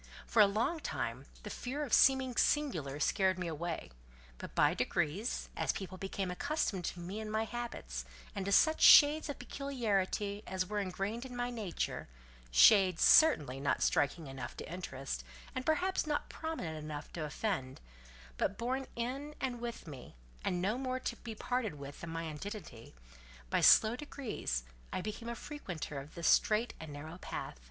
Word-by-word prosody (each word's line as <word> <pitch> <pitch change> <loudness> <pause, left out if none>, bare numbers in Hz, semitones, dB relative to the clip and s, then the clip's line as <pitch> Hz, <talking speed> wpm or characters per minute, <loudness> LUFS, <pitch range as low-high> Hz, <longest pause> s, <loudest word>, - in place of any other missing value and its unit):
For 225 - +4
a 205 - +8
long 230 +11 0
time - - -4 0.2
the - - -6
fear 275 +4 -3
of 265 - -5
seeming 265 -2 +5
singular 165 - +1
scared 190 +4 +2
me 185 - -3
away; 165 - -4 0.5
but - - -8
by - - +4
degrees, 175 - -1
as - - +1
people 190 -2 -6
became 195 -1 -3
accustomed 205 - -1
to 180 - -4
me 185 +5 -5
and 215 -1 -5
my 220 +1 0
habits, 220 - -5 0.3
and 195 - -3
to 200 - -1
such 315 +10 +5
shades 300 +1 +8
of 285 - -4
peculiarity 210 -7 -1
as 185 0 -1
were 210 +2 -2
engrained 200 +4 -3
in 255 -2 -8
my 245 0 -2
nature—shades, 60 - +2
certainly 150 - +6
not 140 -1 +1
striking 150 +3 +1
enough 135 -3 -7
to 165 - -7
interest, 135 - -5 0.3
and 255 - -4
perhaps 355 +2 +1
not 295 -1 -1
prominent 185 - -4
enough 150 -1 -7
to 165 - -3
offend, 150 -4 -3 0.6
but 200 - 0
born 260 +3 -2
in 270 +5 -4
and 250 -3 -3
with 235 -1 -5
me, 135 - -10 0.3
and 180 - 0
no 215 +6 0
more 255 -1 -2
to 245 - -3
be 225 -2 -7
parted 245 -6 -2
with 140 0 -9
than 170 - -6
my 165 0 -3
identity—by 60 - -6
slow 220 +2 +7
degrees 250 - -3 0.3
I - - -2
became 215 +4 -5
a 235 - -3
frequenter 180 - -6
of 140 +3 -11
this 170 - -1
strait 220 +2 +3
and 160 -2 -8
narrow 155 +5 -8
path. - - -6
195 Hz, 165 wpm, -34 LUFS, 150-245 Hz, 0.6 s, a